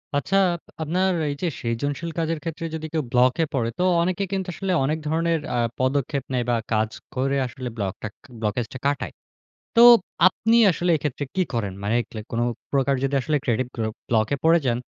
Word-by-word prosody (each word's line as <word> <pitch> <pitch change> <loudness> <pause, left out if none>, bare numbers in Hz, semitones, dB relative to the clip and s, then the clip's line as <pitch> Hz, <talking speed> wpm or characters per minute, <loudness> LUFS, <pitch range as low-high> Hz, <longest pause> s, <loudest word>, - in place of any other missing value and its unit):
আচ্ছা 190 +7 +1 0.4
আপনার 180 +5 +1 0.2
এই - - -1
যে 180 - 0
সৃজনশীল 145 +8 -2
কাজের 165 -1 -1
ক্ষেত্রে 165 0 -4
যদি 160 0 -5
কেউ 160 -2 0
ব্লকে 125 +6 +3
পড়ে 115 -4 0
তো - - +2 0.2
অনেকে 185 +3 0
কিন্তু 190 -1 -2
আসলে 195 +2 -3
অনেক 150 +4 0
ধরনের 165 +1 +1 0.2
আ - - +1 0.2
পদক্ষেপ 135 +1 0
নেয় 125 -2 0
বা 120 - +3 0.2
কাজ 110 0 +2 0.3
করে 135 +2 +1
আসলে 125 0 -6
ব্লকটাক 100 +1 -4 0.3
ব্লকেজটা 110 +4 -2
কাটায়। 145 0 -1 0.6
তো - - +7 0.5
আপনি 225 +5 +1
আসলে 175 0 0
এক্ষেত্রে 145 -1 -3
কী 190 - +2
করেন? 105 -5 -1
মানে 105 +3 +1
কি - - -24
লাইক 110 0 -6
কোন 115 - 0 0.3
প্রকার 140 0 +2
যদি 135 +1 0 0.3
ক্রিয়েটিভ 125 0 0
গ্ল 115 - -1 0.2
ব্লকে 110 +3 +2
পড়ে 165 +1 +6
যান, 120 -1 +1
140 Hz, 175 wpm, -24 LUFS, 120-165 Hz, 0.6 s, তো